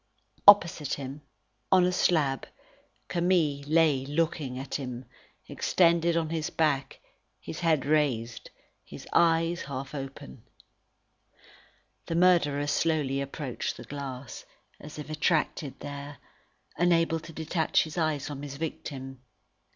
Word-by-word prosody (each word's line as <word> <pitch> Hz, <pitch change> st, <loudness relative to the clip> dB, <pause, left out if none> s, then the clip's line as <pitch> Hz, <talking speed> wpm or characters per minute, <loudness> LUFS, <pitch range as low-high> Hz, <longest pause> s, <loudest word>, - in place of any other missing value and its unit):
Opposite 170 Hz, -7 st, +6 dB
him, 140 Hz, +1 st, -7 dB, 0.5 s
on 185 Hz, -1 st, +6 dB
a 180 Hz, -, +2 dB
slab, 155 Hz, -7 st, +1 dB, 0.6 s
Camille 170 Hz, -5 st, +1 dB
lay 155 Hz, -4 st, +3 dB
looking 145 Hz, -2 st, -1 dB
at 135 Hz, +1 st, -7 dB
him, 125 Hz, -2 st, -4 dB, 0.4 s
extended 170 Hz, -1 st, +2 dB
on 160 Hz, -1 st, -1 dB
his 160 Hz, -2 st, -2 dB
back, 145 Hz, -4 st, 0 dB, 0.4 s
his 155 Hz, -, -7 dB
head 160 Hz, -5 st, +2 dB
raised, 135 Hz, -6 st, 0 dB, 0.3 s
his -, -, -11 dB
eyes 165 Hz, 0 st, +3 dB
half 135 Hz, 0 st, -6 dB
open. 135 Hz, -, -8 dB, 1.7 s
The 165 Hz, -, -2 dB
murderer 165 Hz, -5 st, +3 dB
slowly 145 Hz, -2 st, 0 dB
approached 140 Hz, -2 st, -4 dB
the -, -, -9 dB
glass, 135 Hz, -3 st, -7 dB, 0.4 s
as 150 Hz, 0 st, -10 dB
if 150 Hz, -, -7 dB
attracted 155 Hz, -2 st, -1 dB
there, 145 Hz, 0 st, -7 dB, 0.6 s
unable 165 Hz, -1 st, +2 dB
to 165 Hz, +1 st, -11 dB
detach 160 Hz, +1 st, +1 dB
his 155 Hz, -1 st, -8 dB
eyes 155 Hz, -4 st, 0 dB
from 145 Hz, -2 st, -6 dB
his 145 Hz, -1 st, -7 dB
victim. 135 Hz, -4 st, -6 dB
150 Hz, 120 wpm, -28 LUFS, 140-165 Hz, 1.7 s, Opposite